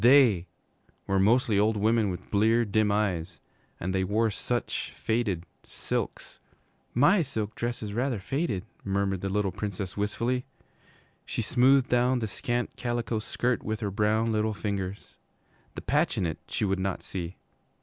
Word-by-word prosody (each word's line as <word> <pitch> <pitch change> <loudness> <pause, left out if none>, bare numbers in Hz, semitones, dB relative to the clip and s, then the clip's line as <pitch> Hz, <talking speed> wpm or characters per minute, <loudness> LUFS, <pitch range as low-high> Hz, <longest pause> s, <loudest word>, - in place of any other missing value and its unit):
They 120 -9 +6 0.6
were 95 0 +1
mostly 110 +1 +4
old 105 +1 +3
women 110 0 +3
with 90 - -6
bleared, 110 +1 +3
dim 110 0 +3
eyes, 95 -6 -1 0.4
and 95 +2 -2
they 95 0 +1
wore 110 +4 +1
such 120 +4 -2
faded 105 -7 -1 0.2
silks. - - -4 0.6
'My 175 - +5
silk 110 -7 -3
dress 120 0 -3
is 105 -1 -4
rather 125 +1 0
faded,' 105 - -2 0.2
murmured 95 -1 0
the 95 - -2
little 100 0 +1
Princess 100 -1 -4
wistfully. 115 +5 0 0.8
She - - -3
smoothed 130 +1 +4
down 125 +1 +3
the 115 - -1
scant 120 +4 -2
calico 120 -2 -1
skirt 120 +2 -1
with 110 +1 -3
her 100 -2 -1
brown 110 +3 +2
little 110 0 0
fingers. 100 -2 -4 0.6
The - - -5
patch - - +1
in - - +1
it 80 -2 -3
she - - -1
would 95 -1 0
not 95 0 -2
see. 90 -1 -5
105 Hz, 155 wpm, -28 LUFS, 95-120 Hz, 0.8 s, They